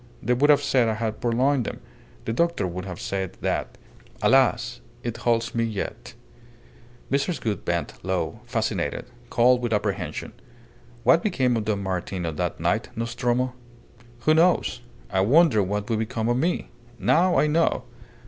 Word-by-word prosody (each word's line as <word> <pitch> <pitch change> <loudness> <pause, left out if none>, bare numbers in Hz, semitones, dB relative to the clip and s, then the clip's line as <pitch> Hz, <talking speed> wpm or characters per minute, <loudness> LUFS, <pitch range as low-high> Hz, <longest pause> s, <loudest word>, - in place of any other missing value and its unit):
They 125 - +2
would 140 +4 +3
have 145 -1 +5
said 130 -5 +3
I 110 - 0
had 110 -1 -3
purloined 125 +3 +2
them. - - -5 0.5
The 115 - -1
doctor 170 - +1
would 90 +1 -4
have 90 -3 -7
said 95 -2 -3
that. - - -2 0.5
Alas! - - +3 0.2
it 120 -1 -3
holds 115 -1 0
me 115 - +1
yet!" 110 -3 -4 1.0
Mrs. 140 +5 0
Gould 105 -5 -2
bent - - -2
low, 95 +2 -2
fascinated 110 - -2 0.2
cold 125 +1 +4
with 120 -2 -2
apprehension. 100 -7 -2 0.7
"What 165 - +5
became 130 - +1
of 110 -2 -1
Don 100 -2 -1
Martin 95 -1 -3
on 80 -2 -3
that - - -2
night, - - 0
Nostromo?" 120 +2 -1 0.7
"Who 155 - +4
knows? 160 -6 +3 0.3
I 95 -1 +2
wondered 125 - +4
what 105 +2 -2
would 110 -2 0
become 110 +1 -2
of 120 - +2
me. 170 +1 -1 0.3
Now 175 +2 +3
I - - +4
know. 160 +2 +2
115 Hz, 160 wpm, -25 LUFS, 100-130 Hz, 1.0 s, have